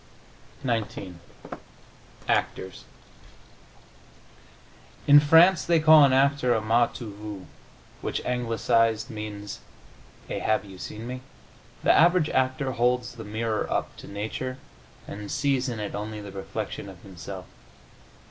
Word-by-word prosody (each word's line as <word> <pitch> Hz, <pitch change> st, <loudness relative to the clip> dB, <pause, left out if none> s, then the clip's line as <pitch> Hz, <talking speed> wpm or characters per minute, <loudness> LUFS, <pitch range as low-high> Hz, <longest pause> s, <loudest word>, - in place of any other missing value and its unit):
XIX 110 Hz, -6 st, -2 dB, 1.1 s
ACTORS 95 Hz, -, -1 dB, 2.2 s
"In 145 Hz, 0 st, +9 dB
France 165 Hz, +4 st, +6 dB
they 170 Hz, -1 st, +3 dB
call 155 Hz, -1 st, +8 dB
an 140 Hz, -, +5 dB
actor 135 Hz, -2 st, +3 dB
a -, -, +2 dB
m'as 115 Hz, +2 st, +2 dB
tu 110 Hz, -5 st, -7 dB
vu, 105 Hz, -2 st, -8 dB, 0.6 s
which, -, -, -2 dB
anglicised, 115 Hz, -2 st, +1 dB
means 105 Hz, -1 st, -6 dB, 0.7 s
a -, -, -3 dB
have 110 Hz, -1 st, 0 dB
you 95 Hz, -2 st, -12 dB
seen 110 Hz, +4 st, -7 dB
me?... 125 Hz, +1 st, -6 dB, 0.6 s
The -, -, +5 dB
average 175 Hz, -1 st, +4 dB
actor 130 Hz, +1 st, 0 dB
holds 125 Hz, 0 st, 0 dB
the 115 Hz, -2 st, -9 dB
mirror 110 Hz, +1 st, -2 dB
up -, -, -2 dB
to -, -, -11 dB
nature 110 Hz, +5 st, -4 dB, 0.5 s
and 105 Hz, 0 st, -7 dB
sees 135 Hz, -2 st, 0 dB
in 115 Hz, -3 st, -4 dB
it 105 Hz, -, -4 dB
only 105 Hz, +1 st, -5 dB
the 100 Hz, -1 st, -8 dB
reflection 95 Hz, 0 st, -5 dB
of 90 Hz, -2 st, -13 dB
himself." 95 Hz, 0 st, -8 dB
115 Hz, 125 wpm, -26 LUFS, 105-130 Hz, 2.2 s, In